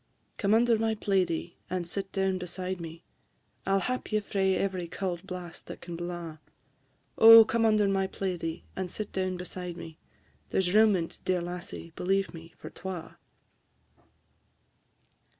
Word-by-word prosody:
Come 205 0 +3
under 230 -1 +4
my 225 0 +1
plaidie, 180 -5 0
and 180 -2 -2
sit 195 +2 -4
down 190 -1 0
beside 180 0 -4
me, 165 0 -8 0.6
I 195 - +3
'll - - +4
hap 255 +5 -3
ye 215 - +3
frae 195 -2 +1
every 185 -3 -1
cauld 180 +1 -4
blast 180 -3 -8
that - - -8
can 170 -1 -7
blaw: 170 -2 -6 0.8
Oh, 225 0 +11
come 225 0 +2
under 215 -2 +4
my 195 -1 +1
plaidie, 175 -4 -3
and 185 -1 -3
sit 210 +3 -5
down 185 -1 -1
beside 180 -1 -6
me! 160 -1 -9 0.5
There - - +1
's 180 -1 +1
room 215 -1 +6
in 165 -2 -1
't, - - -13
dear 185 -1 +1
lassie, 175 -1 -6
believe 195 +2 0
me, 165 0 -11
for - - -9
twa." 185 -3 -7
185 Hz, 160 wpm, -29 LUFS, 175-195 Hz, 0.8 s, Oh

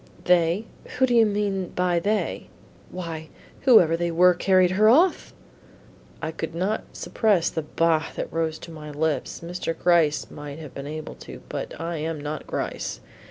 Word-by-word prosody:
"They? 180 +3 +3 0.3
Who 260 - +5
do 245 - 0
you 230 -2 +6
mean 200 -3 -1
by 180 -1 +2
they?" 210 +4 -1 0.4
"Why, 165 -3 -6 0.4
whoever 180 - +6
they 170 +1 -1
were 180 +2 +5
who - - -15
carried 185 -2 +4
her 210 +3 +5
off." 335 +10 +3 0.9
I 160 - -2
could 160 0 -5
not 195 +5 -1
suppress 200 -7 +1
the 160 - -2
"bah!" 160 +1 +1
that - - -5
rose 160 -1 -1
to 170 - -11
my 155 -2 -9
lips. 150 +1 -2
Mr. 170 -1 -4
Gryce 170 -4 +2
might 145 0 -8
have 155 -4 -9
been 140 +1 -7
able 155 +1 -6
to, - - -11
but - - -5
I 165 +1 -3
am 155 0 -3
not 150 +1 -5
Gryce. - - -4
170 Hz, 170 wpm, -24 LUFS, 160-190 Hz, 0.9 s, you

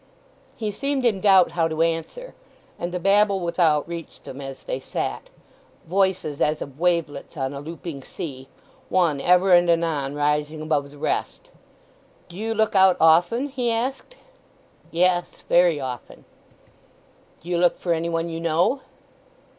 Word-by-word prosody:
He 215 -2 -2
seemed 275 +4 -2
in 210 -5 +2
doubt 190 -3 +5
how 165 -1 +1
to 160 0 0
answer, 165 - -3 0.5
and 175 +1 -3
the 180 - -3
babble 200 +1 +3
without 170 -4 +1
reached 170 -1 -8
them 135 +2 -9
as 135 -1 -8
they - - -3
sat—voices 190 - -4
as 150 0 +1
of 140 +1 -8
wavelets 170 -3 -1
on 135 0 -2
a 140 - -6
looping 160 -1 -7
sea, 135 -3 -8 0.4
one 165 -7 +2
ever 180 +3 +4
and 175 0 +5
anon 160 -5 0
rising 150 +1 0
above 150 -2 -1
the 145 - -15
rest. - - -3 0.8
"Do 170 - -12
you 225 +3 -3
look 220 0 +1
out 190 -1 +5
often?" 175 - +4
he 250 -3 -2
asked. 265 - -3 0.7
"Yes—very 175 -1 +2
often." 130 -3 -7 1.2
"Do 170 - -10
you 175 -1 +1
look 175 0 +3
for 175 - 0
any 165 +1 -2
one 165 0 -1
you 165 -1 -5
know?" 170 - +1
170 Hz, 145 wpm, -23 LUFS, 155-190 Hz, 1.2 s, doubt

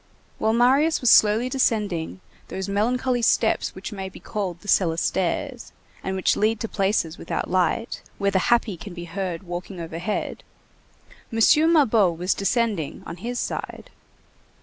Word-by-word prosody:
While 220 - +2
Marius 270 +7 +3
was 250 - +4
slowly 220 +3 +5
descending 205 - -1 0.3
those 190 0 -5
melancholy 245 +5 0
steps 230 - +2
which - - -7
may 190 -2 -5
be - - -13
called 185 -5 -4
the - - -14
cellar 170 -5 +3
stairs, 260 - -2 0.3
and 190 - -2
which 190 - +2
lead 215 +1 +1
to 225 - -2
places 195 -6 -1
without - - -4
light, 185 +5 0 0.2
where 200 0 +1
the 190 - +2
happy 235 -5 +2
can 175 +2 -9
be 175 -1 -7
heard 180 0 -4
walking 180 +1 -6
overhead, 170 +5 -4 0.9
M. 225 - -2 0.3
Mabeuf 215 - +3
was 180 +2 +1
descending 200 - -1
on 170 - -7
his 240 +6 -4
side. - - -5
200 Hz, 150 wpm, -24 LUFS, 180-235 Hz, 0.9 s, slowly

